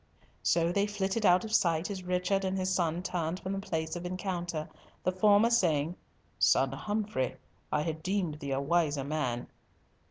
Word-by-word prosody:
So 170 0 +2
they 200 +3 +1
flitted 205 +1 0
out 180 +5 +5
of 220 - -6
sight 170 +1 +2
as 190 -2 -4
Richard 180 +2 0
and 190 0 -1
his 185 0 0
son 170 -1 0
turned 175 -1 -2
from 190 - -4
the 195 - -2
place 160 -4 -3
of 175 - -5
encounter, 175 -3 -3 0.4
the 185 - +2
former 205 +4 +4
saying, 170 -7 +2 0.4
"Son 135 -1 +4
Humfrey, 205 - -2 0.4
I 150 - +1
had 160 -1 -3
deemed 180 -4 -1
thee 140 - -5
a 135 - +1
wiser 145 -1 +1
man." 135 -5 -2
175 Hz, 170 wpm, -30 LUFS, 155-195 Hz, 0.4 s, out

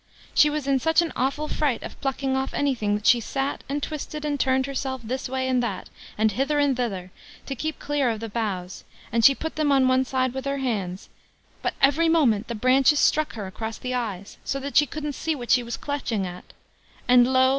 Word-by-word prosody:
She 300 - +6
was 300 -2 -3
in 275 -1 +2
such 320 +5 +3
an 330 - -4
awful 275 +4 -1
fright 290 -5 -1
of - - -9
plucking 270 -1 -1
off 265 0 -2
anything, 240 -8 +1
that 210 - -5
she 240 - +6
sat, 270 +4 -3
and 285 +1 -2
twisted, 300 0 -5
and 290 -1 -1
turned 260 0 +2
herself 265 -1 -3
this 255 +4 -4
way 260 0 -1
and 255 -1 +2
that, 220 -6 -4 0.3
and 220 0 +3
hither 275 +7 0
and 285 -2 +3
thither, 195 -7 -3 0.3
to 275 - -4
keep 310 +5 -3
clear 285 -3 0
of 225 -2 -2
the 225 - -5
boughs, 200 -5 -4 0.3
and 230 0 +1
she 275 +2 +8
put 320 +2 -5
them 300 -2 +2
on 265 -2 +4
one 255 0 +3
side 255 -1 -1
with 265 0 -5
her 275 0 -1
hands; 200 -9 -3 0.5
but - - -2
every 310 +4 +4
moment 245 -10 +3
the 235 - -4
branches 260 +5 +4
struck 310 -1 +2
her 215 -3 -5
across 220 +4 -5
the 255 0 -4
eyes, 210 -6 -4
so 275 - -2
that 280 +1 -6
she 295 - +6
couldn't 295 +2 -4
see 320 +3 -2
what 245 -4 -4
she 250 - +5
was 235 -1 -5
clutching 250 -8 -2
at; 180 0 -8 0.6
and 245 0 +6
lo! 260 0 +5
260 Hz, 220 wpm, -25 LUFS, 230-285 Hz, 0.6 s, she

